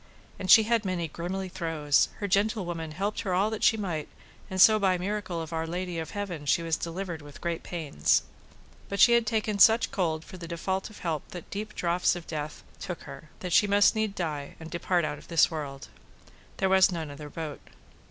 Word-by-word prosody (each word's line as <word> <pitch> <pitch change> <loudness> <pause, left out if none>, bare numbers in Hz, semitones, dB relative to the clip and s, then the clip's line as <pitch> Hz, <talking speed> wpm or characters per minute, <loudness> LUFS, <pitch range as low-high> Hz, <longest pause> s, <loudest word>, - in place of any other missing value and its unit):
And 185 - -5
she 220 +3 +9
had 230 0 +1
many 180 -4 -2
grimly 180 +5 -4
throes; 165 -5 +1
her 205 - -3
gentlewoman 185 -5 0
helped 200 +5 -2
her 190 -5 -1
all 200 +4 +2
that 220 - -4
she 225 - +5
might, 175 -7 -3 0.4
and 190 - -4
so 215 +3 +8
by 190 -2 +2
miracle 190 -2 -3
of 165 0 -6
Our 160 0 -2
Lady 175 0 -3
of 160 - -5
Heaven 180 -8 -5
she 170 - +3
was 165 -1 +1
delivered 170 0 -5
with 145 -1 -12
great 170 -1 -3
pains. 150 - 0 0.7
But 200 - -3
she 240 - +8
had 235 -1 +4
taken 215 -2 0
such 225 +3 +6
cold 160 -4 -1
for 185 - -10
the 170 -1 -8
default 190 +4 -3
of 215 - -13
help 160 -4 -3
that 175 -2 -9
deep 215 +1 -5
draughts 175 +1 +1
of 175 -2 -7
death 155 -1 -5 0.2
took 180 - -6
her, 155 - -11
that - - -7
needs 175 - +2
she 210 - +5
must 200 0 +5 0.2
die 150 -5 -4
and 160 0 -9
depart 175 -1 0
out 150 - -4
of - - -16
this 165 -1 +4
world; 140 -4 -6 0.7
there 190 - +1
was 190 0 +5
none 160 -4 -4
other 145 +1 -9
bote. 155 -2 -6
175 Hz, 210 wpm, -28 LUFS, 160-200 Hz, 0.7 s, she